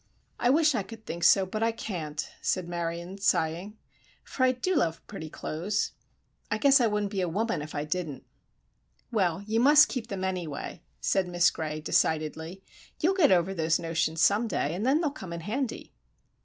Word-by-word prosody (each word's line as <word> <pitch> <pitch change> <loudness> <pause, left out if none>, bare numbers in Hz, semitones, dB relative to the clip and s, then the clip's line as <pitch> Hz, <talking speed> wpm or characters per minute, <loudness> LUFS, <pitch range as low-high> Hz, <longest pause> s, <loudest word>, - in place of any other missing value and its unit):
"I 240 - +2
wish 305 +2 +4
I 225 - 0
could 225 +2 -11
think 170 -2 -5
so, 195 +2 +6
but 215 +4 -4
I 225 0 +3
can't," 160 -9 -5
said 185 -2 -1
Marion, 170 +2 -4
sighing; 185 +2 0 0.5
"for 260 - -3
I 255 - +5
do 260 +9 -1
love 165 - 0
pretty 155 - -8
clothes. 180 +8 -2 0.6
I 215 - 0
guess 275 +3 +5
I 235 - +4
wouldn't 210 -1 -1
be 195 -3 -1
a 180 - 0
woman 220 +1 -1
if 150 +1 -8
I 145 - -2
didn't." 155 -3 -4 0.9
"Well, 190 -3 +1
you 220 +2 0
must 295 +4 +7
keep 240 -3 -4
them, 195 -4 -4
anyway," 180 -6 -4 0.2
said 190 -2 +1
Miss 175 -1 +3
Gray, 155 -1 -4
decidedly. 160 +4 0 0.4
"You'll 355 +5 +3
get 360 - +4
over 185 +1 +3
those 160 -3 +1
notions 165 -1 -1
some 205 +6 +4
day, 160 -7 -1
and 200 +7 -2
then 290 +5 +3
they'll 305 -4 0
come 190 - -8
in 170 - -5
handy." 235 - -4
190 Hz, 185 wpm, -28 LUFS, 165-225 Hz, 0.9 s, must